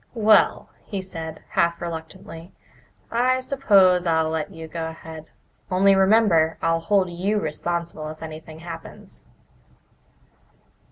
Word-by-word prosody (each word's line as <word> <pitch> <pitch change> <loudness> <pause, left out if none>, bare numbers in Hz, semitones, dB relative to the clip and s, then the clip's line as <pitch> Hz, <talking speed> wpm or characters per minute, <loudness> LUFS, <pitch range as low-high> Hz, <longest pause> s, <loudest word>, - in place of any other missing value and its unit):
"Well," 215 -1 +3
he 200 - -5
said, 165 -4 -8
half 170 0 +1
reluctantly, 165 +1 -8 0.6
"I 255 +2 +2
suppose 195 -10 +3
I'll 160 -1 +2
let 160 +2 -3
you 165 -3 -9
go 165 0 -4
ahead. 160 -1 -10 0.4
Only 195 +1 +4
remember 190 -5 +3
I'll 165 0 +1
hold 190 +1 +1
you 195 +5 -1
responsible 165 -1 -4
if 155 +1 -9
anything 160 0 -9
happens." 170 - -10
170 Hz, 115 wpm, -23 LUFS, 160-195 Hz, 0.6 s, Only